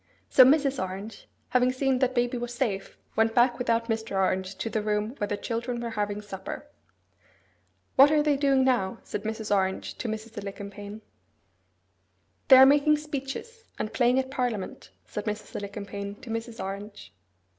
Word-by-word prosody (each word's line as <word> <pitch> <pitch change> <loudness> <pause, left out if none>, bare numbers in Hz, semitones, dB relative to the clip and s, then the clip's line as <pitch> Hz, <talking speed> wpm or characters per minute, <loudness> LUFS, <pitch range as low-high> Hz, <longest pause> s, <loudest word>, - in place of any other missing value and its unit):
So 260 - +9
Mrs. 275 -1 +3
Orange, 195 +3 -7 0.2
having 250 0 +3
seen 260 0 +1
that 260 -1 +1
baby 245 +1 +1
was 240 0 -4
safe, 210 -7 -2 0.2
went 225 0 +2
back 240 0 +4
without 230 -1 +1
Mr. 225 -3 -2
Orange 190 0 0
to 190 - -4
the 220 -1 -1
room 210 +2 -1
where 205 - 0
the 205 - -2
children 235 +2 -3
were 235 -1 -4
having 210 -1 -2
supper. 195 -2 -7 1.3
'What 275 +2 +9
are 300 -1 +3
they 295 -1 +3
doing 275 -1 +3
now?' 235 -8 +1
said 210 - -5
Mrs. 220 -1 -1
Orange 190 -1 -1
to 245 - -3
Mrs. 220 0 -5
Alicumpaine. 200 +1 -8 1.4
'They 265 - +10
are 265 - +10
making 290 +2 +5
speeches, 300 - -6
and 215 - -4
playing 245 +2 +3
at 265 0 -1
parliament,' 245 -7 -3 0.2
said 210 - -6
Mrs. 210 0 -5
Alicumpaine 200 0 -5
to 250 -3 -8
Mrs. 230 0 -5
Orange. 200 +2 -7
225 Hz, 165 wpm, -27 LUFS, 205-260 Hz, 1.4 s, They